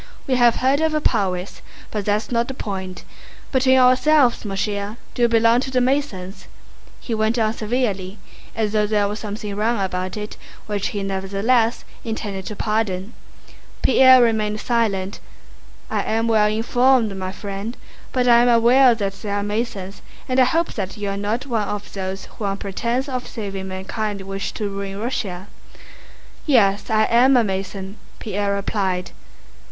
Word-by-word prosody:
"We 270 - 0
have 240 -2 +5
heard 270 +3 +2
of 320 -1 +1
your 305 - 0
prowess. 185 -7 -1 0.3
But 210 -2 -3
that's 210 +3 0
not 235 0 +1
the 265 - -6
point. 190 -5 -5 0.5
Between 260 0 +4
ourselves, 255 +1 +4
mon 195 -2 -4
cher, 205 +2 -2 0.2
do - - -4
you 240 - +6
belong 230 +1 +4
to 265 - -3
the 255 -1 +1
Masons?" 245 -8 -2 0.5
he 235 - -5
went 220 +2 +1
on 220 -1 +1
severely, 210 -4 -2 0.4
as 220 -2 0
though 210 -1 +2
there 205 -1 +2
were 205 - -3
something 210 -1 -5
wrong 220 +2 0
about 185 0 -2
it 210 0 -6 0.3
which 205 -2 -2
he 200 -1 -4
nevertheless 200 +5 0 0.2
intended 205 -4 -4
to 210 - -5
pardon. 210 -1 -2 0.7
Pierre 260 -1 +7
remained 215 -2 +1
silent. 210 -5 -1 0.7
"I - - -1
am 225 +1 0
well 215 -2 +4
informed, 230 0 +2
my 185 -1 -4
friend, 200 +3 -6 0.3
but 250 -1 +1
I 235 -1 +7
am 245 - +4
aware 240 +2 +6
that 195 -3 -4
there 205 -2 -3
are 205 - -1
Masons 205 -2 -4 0.3
and 255 0 +1
I 255 - +7
hope 330 +6 0
that 195 0 -4
you 205 -1 -3
are 195 - -2
not 210 +6 -2
one 225 -6 -1
of 205 0 -5
those 190 0 -4
who 215 - -7
on 195 0 -1
pretense 235 +7 -2
of 255 -2 -4
saving 195 -4 -5
mankind 200 +2 -4
wish 195 +1 -4
to 210 - -3
ruin 195 0 -5
Russia." 200 -5 -3 1.0
"Yes, 205 -8 +3
I 220 -1 +3
am 250 +4 +5
a 240 - +4
Mason," 195 0 -4 0.2
Pierre 200 -1 -2
replied. 190 -2 -2
215 Hz, 170 wpm, -21 LUFS, 195-240 Hz, 1.0 s, Pierre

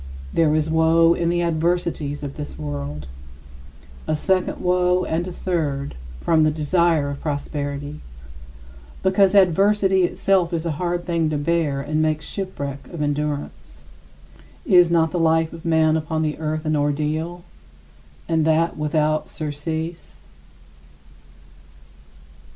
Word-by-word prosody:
There 155 -2 +3
is 155 0 +1
woe 160 +1 +4
in 170 0 0
the 175 0 +1
adversities 165 -3 -1
of 140 -1 -6
this 150 -1 -7
world 75 -1 -5 1.0
a 155 - +1
second 185 +4 0
woe, 180 0 +2
and 170 +3 -2
a - - -5
third, 150 -7 -2 0.3
from 160 -2 +3
the 155 - +4
desire 155 -1 +1
of 140 - -7
prosperity 145 0 -4 1.0
because 190 +1 +3
adversity 195 +1 +4
itself 180 0 +1
is 165 0 -2
a 165 - 0
hard 175 0 -1
thing 165 -3 0
to 155 - -1
bear 150 -2 0
and 155 +2 -1
makes 155 -1 0
shipwreck 140 -8 -5
of 165 -4 -3
endurance. 145 - -4 0.8
Is 180 -2 +6
not 165 -1 +2
the 180 - -1
life 160 0 +2
of 165 0 -11
man 160 -1 +3
upon 160 0 -1
the 155 0 -2
earth 155 0 -3
an 155 0 +1
ordeal, 155 +4 -1 0.8
and 160 -1 +1
that 160 +2 +2
without 155 0 0
surcease? 160 - -5
160 Hz, 130 wpm, -22 LUFS, 150-170 Hz, 1.0 s, Is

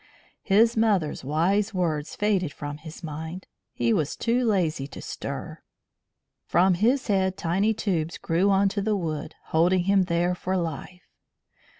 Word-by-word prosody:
His 225 +3 +4
mother's 205 -12 +1
wise 185 +9 +1
words 160 -4 -1
faded 195 -6 +1
from 145 -1 -6
his 160 +3 -11
mind. 160 +4 -6 0.3
He 115 -1 +1
was 155 -2 0
too 240 +2 +1
lazy 175 - 0
to - - -10
stir. - - -6 0.9
From 185 +2 +4
his 240 +9 +2
head 190 -2 +1
tiny 195 +6 +1
tubes 170 -6 -1
grew 175 +5 +1
on 195 0 +4
to 200 +1 -2
the 210 +1 +1
wood, 160 -5 -4
holding 175 +3 +3
him 195 0 +3
there 175 0 +1
for 185 +1 -2
life. 170 +1 -5
180 Hz, 150 wpm, -25 LUFS, 160-200 Hz, 0.9 s, His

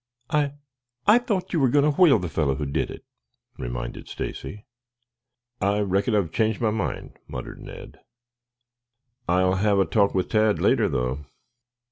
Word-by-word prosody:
"I 145 -2 +1 0.5
I 215 +4 +6
thought 205 -8 -2
you 165 - +2
were 135 -3 +3
going 145 +3 +3
to 150 - +3
whale 155 -9 +7
the 90 -3 -3
fellow 75 -3 0
who 75 - -3
did 70 - -1
it," - - -10 0.5
reminded - - -5
Stacy. 105 +1 -6 1.0
"I 100 +1 +2
reckon 100 +4 +1
I've 95 -6 +1
changed 110 +2 0
my 110 -2 +1
mind," 110 - -4
muttered 65 - -7
Ned. - - -11 1.3
"I'll 95 +1 +3
have 100 +1 +2
a 95 - +4
talk 100 +4 +2
with 95 - 0
Tad 110 -1 +3
later, - - +3
though." 65 +3 -2
100 Hz, 155 wpm, -24 LUFS, 80-120 Hz, 1.3 s, whale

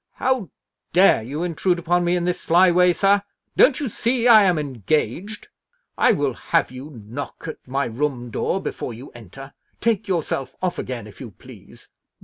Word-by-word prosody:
"How 260 - -1 0.4
dare 180 -8 +5
you 140 +9 -5
intrude 175 +1 0
upon 175 +1 +1
me 175 +1 +1
in 175 -1 -1
this 180 0 -1
sly 175 +2 +4
way, 180 +1 +4
sir? 200 +3 +3 0.3
Don't 260 -1 +5
you 290 - -2
see 235 +2 0
I 220 -4 +8
am 180 -3 +2
engaged? 150 - -2 0.5
I 250 - +4
will 145 - 0
have - - 0
you 130 +3 -9 0.2
knock 130 +6 -7
at 160 - -9
my 135 +2 -1
room 125 0 -3
door 190 - -1
before 120 - -5
you 130 +5 -11
enter. 120 +5 -12 0.3
Take 220 -2 0
yourself 165 -7 -2
off 185 -1 -2
again, 125 -4 -5
if 105 - -14
you 125 - -7
please!" 95 - -16
170 Hz, 175 wpm, -22 LUFS, 130-190 Hz, 0.5 s, I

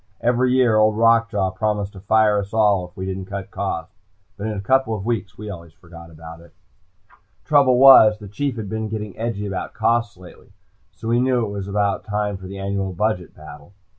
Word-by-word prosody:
Every 125 +1 +1
year, 125 -4 +3
Old 110 0 +3
Rock 115 0 +4
Jaw 100 -4 -1
promised 105 0 -2
to 95 - -11
fire 105 +1 +2
us 100 +2 -6
all, 100 -5 +2
if 90 - -31
we 95 - -4
didn't 95 0 -5
cut 100 0 -7
costs, 95 -2 -4 0.4
but 105 +1 -5
in 105 -1 -3
a - - -4
couple 125 +2 +1
of 100 -2 -7
weeks 110 -5 -3
we 105 - -8
always 85 -5 -9
forgot 85 0 -14
about 80 +1 -12
it. 85 -1 -19 0.9
Trouble 140 -4 +4
was, 125 -5 +8
the 105 -1 -11
Chief 130 +6 -3
had 110 -3 -6
been 110 +1 -4
getting 105 -2 -6
edgy 110 -2 -4
about 95 -2 -5
costs 115 -1 0
lately, 90 -1 -16 0.4
so - - -8
we 120 +1 +2
knew 125 -2 +1
it - - -6
was 100 -1 -5
about 100 0 -1
time 105 -1 -2
for 95 -1 -10
the 100 +1 -8
annual 95 -1 -3
budget 90 -3 -2
battle. 75 +6 -13
105 Hz, 210 wpm, -21 LUFS, 95-115 Hz, 0.9 s, was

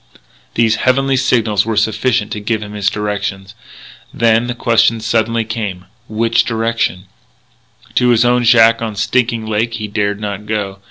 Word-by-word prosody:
These 115 -1 +2
heavenly 135 +1 +1
signals 115 -5 +1
were 110 -1 -3
sufficient 110 +1 0
to 105 - -4
give 105 +1 -2
him 105 0 -9
his 105 0 0
directions. 100 -2 -4 0.6
Then 115 0 +2
the 120 - -3
question 115 -1 +2
suddenly 115 0 0
came, 105 -5 -5 0.2
which 115 +1 +1
direction? 115 -5 -2 0.9
To 125 -1 +2
his 120 0 +4
own 125 0 +2
shack 115 -1 +5
on 110 -2 -4
Stinking 115 +2 0
Lake 110 +2 -1
he 110 -2 -5
dared 105 0 -2
not 105 0 -5
go. 100 -2 -3
110 Hz, 155 wpm, -16 LUFS, 105-115 Hz, 0.9 s, shack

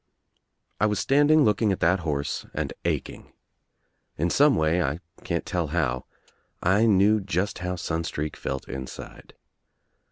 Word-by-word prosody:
I 105 - +3
was 105 -1 0
standing 145 +2 +4
looking 105 -2 +2
at 95 - -2
that 90 +3 +3
horse 75 -4 -3
and - - -2
aching. - - -3 0.8
In 85 +3 0
some 145 0 +5
way, 80 +3 +2
I 75 -1 -1 0.2
can't 85 -1 -2
tell 85 -4 -1
how, 70 -6 -1 0.5
I 100 +6 +3
knew 105 +1 +4
just 95 0 -2
how 90 +1 -3
Sun 85 -2 -3
streak 75 -1 -4
felt 65 - -5
inside. 65 0 -9
90 Hz, 140 wpm, -25 LUFS, 80-105 Hz, 0.8 s, some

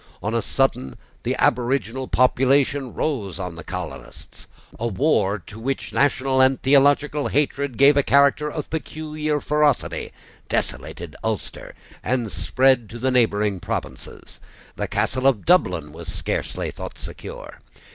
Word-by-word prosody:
On 105 - -1
a 115 - +1
sudden, 85 - 0 0.2
the - - -1
aboriginal 125 0 +1
population 135 +1 +2
rose 105 - -2
on 90 -3 -5
the 85 - -9
colonists. 90 -3 -8 0.3
A 120 - -1
war, 105 -3 +1
to 105 - -11
which 135 +4 -3
national 135 -1 +2
and 130 0 +4
theological 145 +2 +3
hatred 140 -2 -1
gave 140 +1 +6
a 145 - +5
character 140 +2 +3
of 150 -2 -6
peculiar 155 -1 -3
ferocity, 150 -1 0 0.4
desolated - - -3
Ulster, - - -4 0.3
and 120 -4 -1
spread 115 +8 +2
to 120 - -8
the 130 +2 0
neighbouring 105 -5 +2
provinces. - - -6 0.4
The - - -3
castle 130 +1 0
of 125 -7 +2
Dublin 90 - +2
was 80 - -8
scarcely - - -3
thought - - -8
secure. - - -9
130 Hz, 135 wpm, -23 LUFS, 110-140 Hz, 0.4 s, gave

